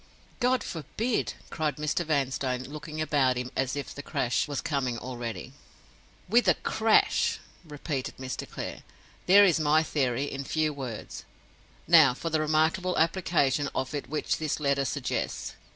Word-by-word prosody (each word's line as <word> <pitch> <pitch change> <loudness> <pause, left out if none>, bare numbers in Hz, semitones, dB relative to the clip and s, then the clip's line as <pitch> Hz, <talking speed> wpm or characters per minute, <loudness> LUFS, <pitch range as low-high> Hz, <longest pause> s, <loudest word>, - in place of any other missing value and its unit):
"God 255 0 +2
forbid!" 215 +9 -2 0.2
cried 155 -4 -1
Mr. 150 +3 -1
Vanstone, 135 -4 -1
looking 150 +2 -7
about 140 -5 +2
him 125 0 -4
as 135 0 0
if 145 - -5
the 145 - -7
crash 125 -3 0
was 145 -2 -3
coming 130 -5 -1
already. 120 0 -6 0.7
"With 235 +5 +3
a - - +6
crash!" 220 0 +2 0.3
repeated 145 -3 -5
Mr. 130 0 -5
Clare. - - -6 0.5
"There 200 +2 +8
is 170 -4 +3
my 155 +1 +3
theory, 135 -4 0
in 140 -1 -5
few 155 +2 0
words. 130 -6 -7 0.6
Now 155 -6 +7
for 165 +5 -4
the 155 - +2
remarkable 160 +4 +1
application 160 -5 +2
of 130 +2 -2
it 145 - -4
which 155 +1 -1
this 155 -1 -1
letter 140 -2 +1
suggests. 135 -2 -3
150 Hz, 150 wpm, -28 LUFS, 135-160 Hz, 0.7 s, There